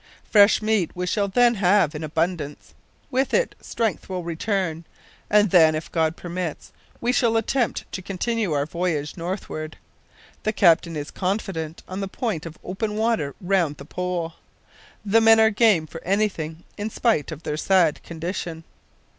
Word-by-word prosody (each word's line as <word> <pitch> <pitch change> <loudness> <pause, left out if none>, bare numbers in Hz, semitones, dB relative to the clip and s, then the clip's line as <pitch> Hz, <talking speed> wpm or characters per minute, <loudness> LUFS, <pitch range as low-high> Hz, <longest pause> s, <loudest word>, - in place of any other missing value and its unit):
Fresh 205 0 +6
meat 215 -5 +2
we 180 0 -2
shall 200 +2 0
then 240 +4 +4
have 190 -5 +3
in 150 +1 -5
abundance. 160 -1 -3 0.4
With 260 +1 +1
it - - +1
strength 225 -4 -2
will 185 -2 -3
return, 170 -1 -2 0.5
and 210 -2 +4
then, 160 -4 +6
if 155 - -5
God 160 0 +1
permits, 175 -2 -5 0.3
we 240 - +1
shall 235 -3 +2
attempt 235 +2 0
to 190 - -5
continue 200 +2 -2
our 145 -1 +1
voyage 160 -3 -2
northward. 165 -3 -5 0.6
The 215 - -1
captain 170 -4 +4
is 145 -1 -5
confident 180 -5 -3
on 185 +1 -5
the 195 - -2
point 190 -6 -3
of 160 - -10
open 210 +3 -3
water 220 -10 0
round 175 -6 +1
the 140 - -10
Pole. 175 0 -3 0.7
The 220 +3 +4
men 225 0 +7
are 220 0 +5
game 210 -6 +4
for 165 +2 -10
anything 175 -5 -1 0.2
in 210 +2 -2
spite 220 - +1
of 155 +1 -8
their 150 - -2
sad 170 -1 +2
condition." 170 0 -5
180 Hz, 160 wpm, -23 LUFS, 160-210 Hz, 0.7 s, men